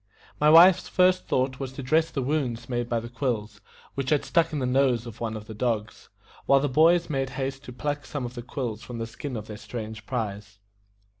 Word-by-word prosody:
My 150 - +5
wife's 175 +3 +7
first 185 0 +3
thought 130 0 0
was 135 -2 -5
to 135 - -7
dress 160 +5 +2
the 135 - -3
wounds 125 -5 -1
made 120 -1 -2
by 120 - +1
the 115 - -7
quills, 115 -4 -3 0.3
which 135 -1 -3
had 150 -2 +2
stuck 165 -1 +2
in 155 - -2
the 130 - -1
nose 125 -2 +2
of 115 -1 -10
one 110 -1 -2
of 105 - -9
the 110 - -8
dogs, 110 -1 -3 0.4
while 140 - +6
the 145 - 0
boys 165 +5 +4
made 135 -3 -1
haste 135 +1 -4
to - - -8
pluck 145 +3 -4
some 145 -4 -4
of 120 - -6
the 120 - -6
quills 120 -3 -4
from 120 - -8
the 115 - -3
skin 125 +2 -6
of 105 - -6
their 105 -1 -8
strange 110 -2 -7
prize. 105 -4 -4
125 Hz, 225 wpm, -26 LUFS, 115-145 Hz, 0.4 s, wife's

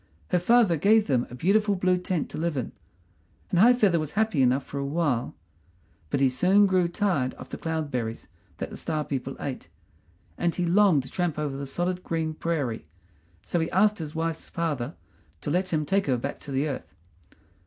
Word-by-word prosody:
Her - - +2
father 210 -2 +4
gave 210 +6 +4
them 125 -4 +1
a 125 - -8
beautiful 200 +8 +2
blue 185 0 +2
tent 180 -3 -2
to - - -6
live 165 -2 -1
in, 125 - -3 0.8
and 175 - +2
High 240 +6 +7
feather 195 -8 +3
was 155 -1 -4
happy 215 -8 +1
enough 130 +2 +3
for 140 - -6
a - - -2
while; 140 -4 -1 0.7
but 135 - 0
he 135 - +5
soon 185 +11 +4
grew 185 -3 +2
tired 170 -9 0
of - - -11
the - - -6
cloud 160 -3 -3
berries 115 -2 -3 0.3
that - - -5
the - - -7
Star 155 -2 -2
people 135 -1 -4
ate, 135 -3 -5 0.7
and 175 -1 +1
he 180 - 0
longed 175 -5 +4
to - - -12
tramp 175 -4 -1
over 150 -3 -2
the 140 0 -5
solid 180 +5 -2
green 160 -1 -2
prairie, 145 - -2 0.6
so 175 - -1
he 160 - -1
asked 210 +2 +3
his 155 -1 -6
wife's 165 0 -3
father 150 -8 -2 0.5
to - - -3
let 180 +3 0
him 155 -2 0
take 195 +2 +1
her 130 -2 +2
back 140 +4 -4
to 145 - -9
the 135 +3 0
earth. 140 - -6
165 Hz, 200 wpm, -26 LUFS, 140-185 Hz, 0.8 s, High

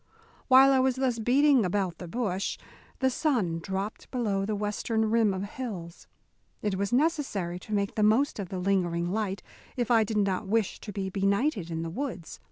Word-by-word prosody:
While 265 +1 +7
I 265 - +4
was 260 -1 +2
thus 260 -3 0
beating 265 +2 +4
about 185 -1 -1
the 180 - -7
bush 200 -2 -2 0.4
the 265 - +2
sun 230 - 0
dropped 195 +4 -5
below 205 -6 -1
the 215 - -1
western 215 +2 -1
rim 225 -2 +3
of 190 0 -3
hills. 200 -6 -7 0.6
It 210 -2 0
was 195 +1 -1
necessary 245 - 0
to 215 - -12
make 200 -1 0
the 215 - -1
most 220 +5 +3
of 190 -3 -4
the 190 - -4
lingering 180 -2 0
light, 200 -3 -2 0.3
if 245 -1 -1
I 225 -2 +5
did 215 0 -3
not 195 -1 0
wish 220 -1 0
to 210 - -8
be 190 -1 -4
benighted 200 - 0
in 165 0 -3
the 165 - -5
woods. 235 - -5
205 Hz, 185 wpm, -28 LUFS, 190-245 Hz, 0.6 s, While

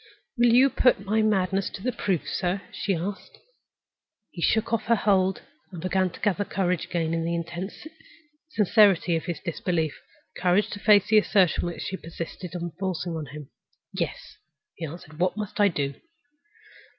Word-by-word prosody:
"Will 240 -1 +4
you 255 +3 +6
put 205 -6 +3
my 215 +2 +2
madness 195 -2 +1
to 190 - -9
the 255 - +1
proof, 195 -7 -1
sir?" 185 +2 -1
she 195 -2 -1
asked. 185 +3 -5 0.9
He 170 - -8
shook 220 +5 +1
off 225 -1 0
her 230 - +4
hold; 195 -3 +2 0.3
he 180 - -8
began 185 +2 0
to - - -13
gather 205 -2 +1
courage 180 -4 -1
again, 165 -2 -1
in 165 0 0
the 170 +1 -1
intense 175 - -5 0.6
sincerity 200 - +4
of 160 - -2
his 175 -2 -3
disbelief, 170 -3 -1 0.4
courage 180 +3 +2
to 205 - -5
face 205 -1 +5
the 215 -1 +7
assertion 190 -5 +2
which 175 - -5
she 190 - -4
persisted 165 +1 -7
in 175 -1 -4
forcing 180 -3 -2
on 155 -2 -5
him. 145 0 -10 0.4
"Yes," 140 - -4 0.4
he 165 - -5
answered. 155 0 -11
"What 185 +3 +1
must 210 0 -5
I 205 - +6
do?" 145 -6 -1
185 Hz, 170 wpm, -26 LUFS, 170-205 Hz, 0.9 s, the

